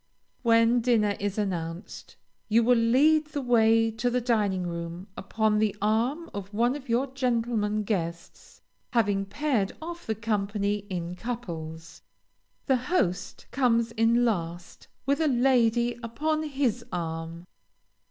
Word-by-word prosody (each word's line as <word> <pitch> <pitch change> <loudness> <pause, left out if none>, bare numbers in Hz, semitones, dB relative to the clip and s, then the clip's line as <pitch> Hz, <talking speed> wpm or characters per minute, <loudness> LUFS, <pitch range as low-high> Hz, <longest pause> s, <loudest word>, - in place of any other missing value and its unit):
When 230 0 +4
dinner 220 -4 +2
is 200 0 -2
announced, 175 -3 -4 0.3
you 230 +2 +4
will 245 +2 +5
lead 285 +7 +4
the 295 -2 -4
way 225 -2 +4
to 230 +3 -1
the 250 +1 +1
dining 210 -6 0
room 170 +1 -5
upon 215 +1 0
the 215 -1 +1
arm 235 +11 0
of 200 -1 -6
one 240 +5 +1
of 280 -3 -9
your 240 +4 +2
gentlemen 235 -5 -1
guests, 170 -5 -5 0.3
having 205 -4 +2
paired 235 -4 0
off 340 +2 -8
the 220 - 0
company 205 -1 -1
in 175 -2 -4
couples. 170 -7 -6 0.6
The 265 -2 +3
host 245 - -1
comes 235 -3 +2
in 230 +1 +3
last 175 -5 -3 0.2
with 280 +4 +1
a 315 - +3
lady 240 -2 +2
upon 305 +7 -1
his 270 -6 -1
arm. 165 0 -4
225 Hz, 135 wpm, -27 LUFS, 195-245 Hz, 0.6 s, will